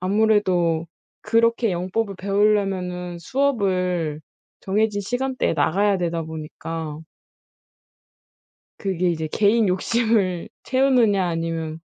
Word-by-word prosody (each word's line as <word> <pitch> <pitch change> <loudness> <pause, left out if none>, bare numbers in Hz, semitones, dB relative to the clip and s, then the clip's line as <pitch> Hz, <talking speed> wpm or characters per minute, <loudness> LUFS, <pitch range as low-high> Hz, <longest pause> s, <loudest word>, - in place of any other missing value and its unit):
아무래도 185 -5 +2 0.3
그렇게 230 0 +2
영법을 190 +3 -2
배울려면은 195 -3 0
수업을 185 - 0 0.4
정해진 205 +1 0
시간대에 250 +5 -1
나가야 190 +6 +2
되다 170 -2 -1
보니까 160 0 -6 1.8
그게 185 -3 0
이제 160 -2 -2
'개인 215 +1 +3
욕심을 190 -1 +1
채우느냐 250 -7 +3
아니면 165 -1 -3
190 Hz, 245 characters per minute, -22 LUFS, 170-215 Hz, 1.8 s, 개인